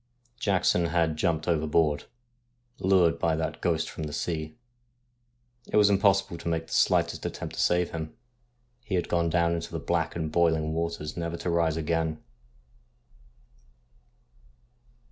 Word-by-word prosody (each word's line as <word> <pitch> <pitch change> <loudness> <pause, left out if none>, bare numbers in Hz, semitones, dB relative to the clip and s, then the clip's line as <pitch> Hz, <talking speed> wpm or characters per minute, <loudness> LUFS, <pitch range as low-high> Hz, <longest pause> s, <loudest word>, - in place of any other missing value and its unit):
Jackson 90 -5 +2
had 80 -2 +1
jumped 80 0 0
overboard, 80 -2 +1 0.7
lured 90 -3 +3
by 80 -1 +1
that 80 0 -3
ghost 80 -2 0
from 80 - -6
the 75 - -6
sea. 80 0 -3 1.1
It - - +2
was 105 -1 +6
impossible 100 -3 +2
to - - -7
make 80 -1 -1
the - - -9
slightest - - +2
attempt - - -5
to - - -2
save 90 0 +2
him; 80 -1 -6 0.7
he 105 -5 -2
had 90 - 0
gone 85 -1 +1
down 85 0 +2
into 85 -1 -4
the - - -3
black - - -1
and 80 -2 -3
boiling 80 -2 +2
waters 80 -2 -3
never 85 0 -3
to 85 - -2
rise 85 -2 +1
again. 80 -1 -1
85 Hz, 145 wpm, -27 LUFS, 80-85 Hz, 1.1 s, was